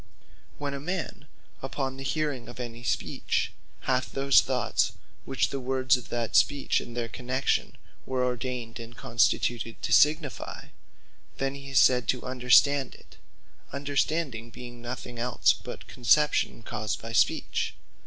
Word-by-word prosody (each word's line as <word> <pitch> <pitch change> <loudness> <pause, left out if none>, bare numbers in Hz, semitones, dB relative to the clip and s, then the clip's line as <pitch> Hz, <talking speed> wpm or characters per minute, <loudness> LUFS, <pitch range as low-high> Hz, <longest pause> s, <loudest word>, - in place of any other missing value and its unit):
Understanding - - -30
When 140 -1 -2
a 140 - -4
man 165 -2 -4 0.3
upon 135 0 -3
the 135 - -6
hearing 140 -4 -2
of 120 - -10
any 120 -1 -6
Speech, 115 - -1 0.3
hath 130 -1 0
those 135 0 +5
thoughts - - 0 0.3
which 135 - 0
the 140 - -2
words 130 +1 +2
of 125 -2 -7
that 120 -1 -2
Speech, 145 -2 +3
and 120 0 -9
their 120 -1 -1
connexion, 130 +3 -1 0.3
were 130 -1 0
ordained 125 -1 -3
and 115 +1 -9
constituted 115 0 +1
to - - 0
signifie; 150 +3 +2 0.7
Then 135 0 -1
he 140 0 -9
is 135 - +4
said 125 -2 +5
to 125 - 0
understand 130 +2 +4
it; - - -18 0.5
Understanding 140 -3 -1
being 120 +1 -10
nothing 120 0 -6
els, 125 0 +3
but - - -9
conception 130 -1 +2
caused 110 0 -3
by 115 0 -7
Speech. 115 - +1
130 Hz, 145 wpm, -28 LUFS, 120-140 Hz, 0.7 s, those